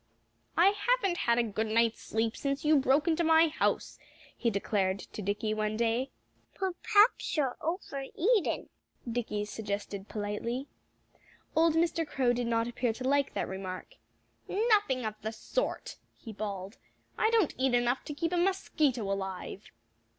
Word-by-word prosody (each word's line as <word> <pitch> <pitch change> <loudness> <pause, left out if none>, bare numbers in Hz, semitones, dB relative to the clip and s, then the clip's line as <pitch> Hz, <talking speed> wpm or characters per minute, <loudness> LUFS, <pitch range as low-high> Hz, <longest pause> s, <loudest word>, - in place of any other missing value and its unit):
"I 350 +4 +7
haven't 410 -2 +1
had 235 -7 +2
a 240 - +4
good 220 0 -2
night's 230 +1 +2
sleep 225 0 -1
since 275 +1 -2
you 305 +1 +5
broke 275 +5 +3
into 335 +1 +2
my 325 0 +5
house," 305 - -1 0.4
he 235 - +1
declared 200 -2 0
to 205 - -8
Dickie 210 +2 -1
one 215 0 -1
day. 235 +3 +1 0.5
"Perhaps 390 +2 +2
you're 270 -4 +1
over 315 -5 -3
eating," 420 0 +1 0.4
Dickie 225 -3 -2
suggested 205 -1 -5
politely. 220 +5 -3 0.9
Old 320 0 +4
Mr. 330 0 +2
Crow 255 -4 +1
did 245 -1 -1
not 230 0 +1
appear 240 -1 -1
to 255 - -7
like 280 0 +2
that - - -1
remark. 190 -1 -6 0.6
"Nothing 410 - +2
of 215 - -2
the 220 - -3
sort!" - - -3 0.2
he 225 - -9
bawled. 200 0 -5 0.4
"I 440 - +2
don't 450 -8 +3
eat 260 -1 +3
enough 245 +1 +1
to 295 - -5
keep 330 +2 -1
a - - +2
mosquito 330 - +1
alive." 195 0 -4
245 Hz, 150 wpm, -30 LUFS, 215-325 Hz, 0.9 s, I